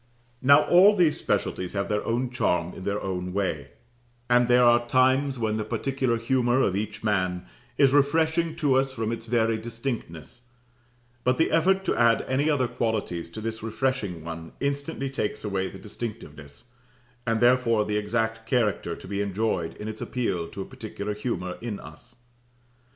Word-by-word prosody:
Now 140 +3 +6
all 195 +4 +6
these 170 -6 +3
specialties 90 -1 -1
have 100 -1 -1
their 105 0 -1
own 120 +2 -1
charm 90 -8 0
in 95 - -9
their 100 +1 -1
own 90 -1 -4
way: 90 -8 -2 0.6
and 120 0 +5
there 125 0 +5
are 120 0 +4
times 130 +2 +3
when 110 -2 -1
the 110 - -1
particular 130 +2 -1
humour 120 +1 +1
of 95 - +1
each 105 +1 -4
man 90 - 0 0.3
is 135 -1 +5
refreshing 160 +3 +2
to 145 -5 +2
us 135 0 +1
from 115 -3 -3
its 115 0 -6
very 115 -1 +1
distinctness; 115 - -6 0.7
but 125 0 +2
the 160 - +2
effort 190 +4 +3
to - - +1
add 115 -1 +3
any 140 +4 +1
other 135 -5 +2
qualities 105 -9 -2
to 95 +6 -8
this 110 0 -4
refreshing 110 -6 -2
one 80 0 -7
instantly 140 0 -2
takes 105 -6 -3
away 95 -3 -1
the 95 - -10
distinctiveness, 105 -3 -9 0.6
and 115 -1 +1
therefore 120 -3 +3
the 105 0 -1
exact 115 +1 -1
character 110 -8 0
to - - -12
be 100 +1 -2
enjoyed 100 -4 -1
in 105 - -6
its 110 0 -6
appeal 95 -9 -2
to 95 - -6
a - - -11
particular 105 -1 -6
humour 95 -5 -4
in 115 -4 -4
us. - - -13
115 Hz, 170 wpm, -26 LUFS, 100-130 Hz, 0.7 s, Now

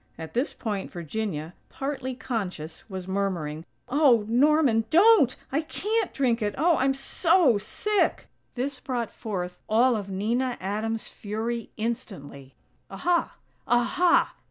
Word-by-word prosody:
At 160 -1 -8
this 255 +6 0
point 210 -4 -4
Virginia, 170 -2 -4 0.2
partly 270 -2 -4
conscious, 195 -10 -5
was 190 -2 -6
murmuring: 180 -6 -2 0.2
"Oh, 250 -5 +4
Norman! 255 -2 +3
Don't!! 360 - +6 0.2
I 285 +4 +1
can't 420 +6 -1
drink 245 -4 +1
it! 205 -1 -1
Oh! 330 +3 +3
I'm 270 +1 +2
so 285 - +3
sick!!" 415 - 0 0.3
This 260 +1 -3
brought 245 -4 -3
forth 180 -4 -5
all 235 +3 +4
of 200 -2 -4
Nina 235 +6 -1
Adams' 215 +3 -3
fury 225 +3 -4
instantly. 195 - -5 0.3
"_Aha! 345 -1 0 0.4
Aha! 245 +9 +3
235 Hz, 125 wpm, -26 LUFS, 200-270 Hz, 0.4 s, Don't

